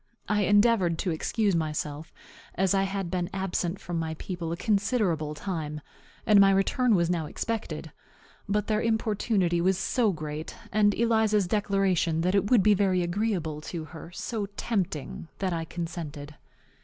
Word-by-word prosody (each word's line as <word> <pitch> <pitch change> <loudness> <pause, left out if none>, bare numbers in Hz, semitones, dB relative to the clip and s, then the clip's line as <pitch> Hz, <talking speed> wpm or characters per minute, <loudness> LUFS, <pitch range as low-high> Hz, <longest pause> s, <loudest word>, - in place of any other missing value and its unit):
I 210 -1 +2
endeavored 205 -4 +4
to 180 - -1
excuse 200 +4 0
myself, 155 -1 -3 0.4
as 190 0 +2
I 195 0 +2
had 195 -3 -3
been 180 -1 -1
absent 190 -1 -2
from 175 -1 -4
my 160 -1 -3
people 170 0 -5
a 170 - -3
considerable 195 - 0
time, 150 -3 -4 0.5
and 210 -2 +6
my 195 - +7
return 205 +5 +3
was 170 -2 +2
now 165 -3 -1
expected. 165 -7 -4 0.6
But 210 0 +1
their 215 0 +1
importunity 210 -5 +1
was 190 +1 +2
so 220 +3 +1
great, 155 -1 -6 0.2
and 205 -1 +3
Eliza's 220 -3 +2
declaration 190 -4 +1
that 180 +2 +1
it 200 0 +2
would 235 -6 +5
be 210 - +6
very 190 -3 +2
agreeable 175 -5 -1
to 160 0 -5
her 165 +1 -10
so 210 +3 -4
tempting, 165 - -2
that 185 -2 -1
I 165 -1 -2
consented. 160 -4 -6
185 Hz, 155 wpm, -27 LUFS, 165-205 Hz, 0.6 s, my